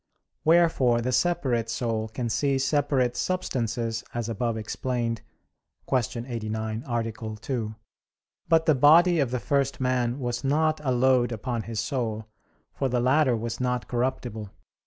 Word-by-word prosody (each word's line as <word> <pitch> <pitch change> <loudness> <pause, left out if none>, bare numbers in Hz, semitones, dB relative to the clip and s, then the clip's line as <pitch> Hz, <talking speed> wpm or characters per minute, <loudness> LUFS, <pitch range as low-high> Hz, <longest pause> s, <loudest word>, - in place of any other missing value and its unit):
Wherefore 160 -8 +4
the 125 +2 -1
separate 130 -5 +1
soul 115 -2 -1
can 120 +2 -4
see 135 +4 +1
separate 135 -2 +1
substances, 115 -10 -2
as 120 -2 -2
above 115 +1 -1
explained 115 +1 -2 0.7
(Q. 120 -2 -1
89, 110 -1 -3
A. 115 -2 -1 0.2
2). 110 -1 -4 0.7
But 165 -1 +4
the 155 - +5
body 160 +6 +6
of 135 -4 +2
the 125 0 -2
first 140 +1 0
man 125 -1 0
was 120 -1 -3
not 155 +3 +1
a 130 - +1
load 125 -1 +3
upon 115 +1 -3
his 115 -1 -5
soul; 115 -2 -2 0.5
for 135 - -1
the 125 0 +1
latter 130 0 +3
was 115 +1 -4
not 125 -1 -1
corruptible. 120 -4 -2
125 Hz, 140 wpm, -26 LUFS, 115-135 Hz, 0.7 s, body